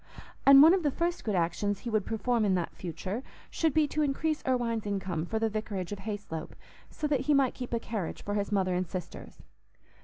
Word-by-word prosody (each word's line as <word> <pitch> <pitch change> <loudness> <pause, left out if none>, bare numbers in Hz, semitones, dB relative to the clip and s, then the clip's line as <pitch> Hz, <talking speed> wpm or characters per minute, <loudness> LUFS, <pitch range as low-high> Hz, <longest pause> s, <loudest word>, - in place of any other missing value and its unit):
And 275 0 +10
one 325 +3 +8
of 380 - +2
the 300 - +2
first 340 +5 -2
good 210 -3 -1
actions 185 +4 0
he 240 - -4
would 215 -2 0
perform 230 +1 0
in 195 -3 +3
that 175 -2 -2
future 185 - -5 0.3
should 325 -1 +1
be 310 +1 +3
to 305 - -1
increase 300 +2 0
Irwine's 235 -4 0
income 185 -5 -2
for 220 - -2
the 225 0 +1
vicarage 210 -4 -4
of 205 - -5
Hayslope, 200 -6 -6 0.3
so 305 - -5
that 295 -3 +2
he 295 - +6
might 270 -2 +3
keep 250 -1 -7
a 235 - 0
carriage 215 -6 -4
for 205 - -3
his 205 0 -1
mother 190 -3 +1
and 180 0 -1
sisters. 180 0 -8
215 Hz, 215 wpm, -29 LUFS, 190-275 Hz, 0.3 s, And